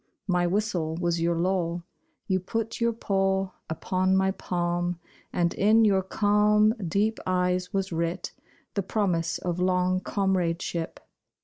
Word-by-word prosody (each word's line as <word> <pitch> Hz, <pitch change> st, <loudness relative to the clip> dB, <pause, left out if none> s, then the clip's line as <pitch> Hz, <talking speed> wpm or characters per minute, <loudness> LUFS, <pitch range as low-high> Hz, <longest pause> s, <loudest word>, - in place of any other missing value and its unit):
My 180 Hz, -2 st, +2 dB
whistle 180 Hz, -5 st, -1 dB
was 170 Hz, -1 st, 0 dB
your 170 Hz, 0 st, +2 dB
law, 175 Hz, -1 st, 0 dB, 0.4 s
You 185 Hz, -1 st, +1 dB
put 225 Hz, +5 st, -3 dB
your 235 Hz, 0 st, +3 dB
paw 195 Hz, -3 st, 0 dB, 0.2 s
Upon 185 Hz, +3 st, +1 dB
my 190 Hz, 0 st, +3 dB
palm, 175 Hz, -1 st, -2 dB, 0.3 s
And 170 Hz, -1 st, +1 dB
in 220 Hz, +3 st, +4 dB
your 195 Hz, -2 st, +4 dB
calm, 210 Hz, +2 st, +3 dB
deep 210 Hz, +6 st, +1 dB
eyes 180 Hz, 0 st, +1 dB
was 195 Hz, -1 st, -1 dB
writ 165 Hz, +1 st, -2 dB, 0.4 s
The 200 Hz, -, 0 dB
promise 180 Hz, -4 st, 0 dB
of 175 Hz, -1 st, -3 dB
long 180 Hz, 0 st, +2 dB
comradeship. 180 Hz, -4 st, -1 dB
185 Hz, 130 wpm, -27 LUFS, 175-200 Hz, 0.4 s, in